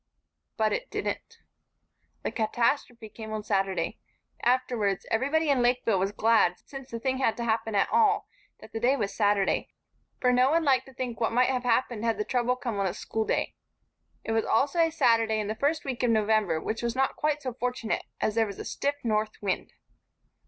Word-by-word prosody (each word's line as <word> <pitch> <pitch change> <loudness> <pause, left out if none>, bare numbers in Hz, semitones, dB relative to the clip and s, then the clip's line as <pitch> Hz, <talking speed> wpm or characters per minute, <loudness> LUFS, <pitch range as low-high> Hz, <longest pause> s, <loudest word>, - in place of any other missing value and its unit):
But - - +2
it - - -3
didn't. 460 - -4 0.9
The - - -2
catastrophe 235 +1 0
came 220 +1 -9
on 215 -1 -3
Saturday. 195 -2 -1 0.4
Afterwards, 240 -6 +1
everybody 285 +7 +1
in 275 -3 +3
Lakeville 240 -4 +2
was 195 +2 0
glad, 215 -4 +3
since 270 -2 -9
the 230 - -5
thing 260 +2 -1
had 225 -4 +1
to 235 - -3
happen 225 -1 -1
at 200 - +3
all, 425 -3 +3 0.3
that - - -13
the 225 - -2
day 250 +4 +3
was 200 -7 -2
Saturday, 205 -2 +1 0.5
for 250 0 +3
no 250 +1 +4
one 330 +2 +2
liked 265 -3 +2
to 265 - -13
think 245 -3 -4
what 225 - +2
might 250 +2 +3
have 255 -1 0
happened 235 -2 +1
had 230 -2 +1
the 210 - -2
trouble 250 0 +1
come 235 -5 -4
on 195 - +1
a 180 - -3
schoolday. 220 0 -1 0.7
It - - -3
was 225 0 +2
also 280 +9 +1
a 330 -1 +5
Saturday 230 -7 +3
in 210 - -1
the 215 - -1
first 290 +7 0
week 260 -3 -3
of 245 - +2
November, 215 -6 +2
which 220 +7 -3
was 235 0 -2
not 265 +1 +1
quite 300 -1 -1
so 255 -2 -3
fortunate, 250 -2 -2 0.2
as 215 - 0
there 225 0 +2
was 200 - -7
a - - -7
stiff 285 +1 -1
north 215 -2 -1
wind. 195 -3 -2
235 Hz, 200 wpm, -28 LUFS, 215-260 Hz, 0.9 s, a